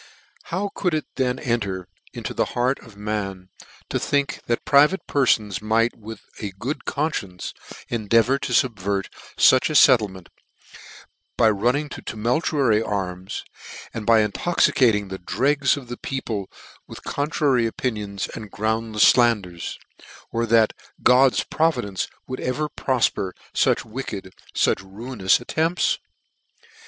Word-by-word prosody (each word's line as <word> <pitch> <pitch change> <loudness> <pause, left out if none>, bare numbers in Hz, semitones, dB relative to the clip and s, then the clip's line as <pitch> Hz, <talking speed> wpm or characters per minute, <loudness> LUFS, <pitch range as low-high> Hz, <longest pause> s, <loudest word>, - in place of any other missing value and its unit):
" - - -30
How 195 +3 -1
could 180 -4 0
it 155 - -2
then 125 -1 0
enter 100 -7 -2 0.2
into - - -6
the - - +1
heart 125 +3 +1
of 110 -3 -16
man, 100 -3 -4 0.4
to - - -1
think 145 0 0
that 120 - -1
private 150 +7 +4
perfons 110 -8 +1
might 115 +2 +1
with 110 -1 -10 0.2
a 100 -2 -5
good 130 +9 -4
conference 125 - -3 0.3
endeavour 115 +4 +2
to - - -4
fubvert 100 -7 0 0.3
fuch 130 +3 +5
a 155 - -3
fet 130 -4 +8
tlement, 95 -4 -7 1.1
by 110 - +5
running 125 +9 +1
to - - -8
tumultuary 120 0 +1
arms, 95 -3 -4 0.5
and 110 -2 -6
by 115 -1 +6
intoxicating 105 - +2
the 95 0 -6
dregs 140 +9 +1
of 135 -3 -9
the 120 0 -6
people 110 -7 -4 0.4
with - - -11
contra 145 +1 -1
dictory 120 -3 +3
opinions 105 -4 -3
and 105 -3 -8
groundlefs 110 0 +3
(landers: 105 -8 +1 0.5
or 115 0 -1
that 115 -1 +4 0.3
God's 130 +1 +5
providence 130 - 0 0.2
would 130 - -5
ever 150 +4 -1
profper 115 -10 0 0.2
fuch - - +2
wicked, 105 -5 -6 0.2
fuch - - +2
ruinous 100 +1 0
attempts? 160 +8 0
115 Hz, 135 wpm, -23 LUFS, 100-135 Hz, 1.1 s, fet